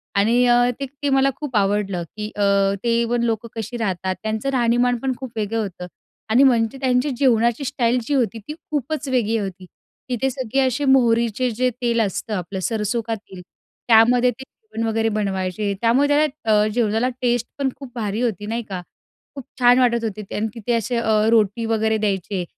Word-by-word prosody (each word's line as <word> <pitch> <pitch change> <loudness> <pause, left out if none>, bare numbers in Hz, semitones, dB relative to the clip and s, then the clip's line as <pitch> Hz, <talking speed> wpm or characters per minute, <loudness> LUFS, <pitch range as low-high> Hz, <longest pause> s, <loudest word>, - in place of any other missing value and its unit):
आणि 230 +5 +3 0.3
ते 275 - -2 0.2
ते 285 - +2
मला 270 0 +3
खूप 290 -5 -6
आवडलं, 200 -3 0
की 210 0 -4
अ, 205 - -3 0.4
ते 235 -1 +2
इव्हन 235 0 0
लोकं 230 -1 -1
कशी 225 +2 -5
राहतात, 190 -4 -2
त्यांचं 220 +4 -2
राहणीमान 245 -1 +2
पण 265 +1 -1
खूप 260 -2 -7
वेगळं 220 +1 -1
होतं. 180 -3 -6 0.4
आणि 240 +5 +5
म्हणजे 240 -1 +3
त्यांची 255 +2 +1
जेवणाची 235 -1 +2
स्टाईल 245 -3 +1
जी 290 - -1
होती, 235 -4 0
ती 300 - -4 0.2
खूपच 295 0 -2
वेगळी 230 -3 +1
होती. 190 -3 -5 0.4
तिथे 250 +2 0
सगळे 260 0 -2
असे 265 +2 0
मोहरीचे 235 -2 +3
जे 250 +3 +1
तेल 235 -1 +1
असतं 210 +1 -2
आपलं, 190 +1 -4
सरसो 220 +3 -1
का 225 - -1
तेल, 190 -3 -12 0.5
त्यामध्ये 240 +2 +5
ते 265 +3 -11
जेवण 245 - -6
वगैरे 225 0 +1
बनवायचे, 200 -1 -2
त्यामुळे 240 +5 +3
त्याला 290 -8 +2
जेवणाला 225 +1 +1
अ, - - 0
टेस्ट 240 -1 +1
पण 275 - +1
खूप 275 -3 -11
भारी 215 -1 -2
होती, 215 -5 -1
नाही 230 +2 -3
का. 185 -2 -4 0.5
खूप 275 - -8 0.2
छान 245 0 +6
वाटत 235 -2 +2
होते 215 -1 -4
ते. 195 - -10
आणि 220 +2 -1
तिथे 230 0 -3
असे 230 +2 -2
अ, 230 -1 0 0.2
रोटी 225 0 +2
वगैरे 220 0 +1
द्यायचे. 195 -3 -2
230 Hz, 185 wpm, -21 LUFS, 215-250 Hz, 0.5 s, छान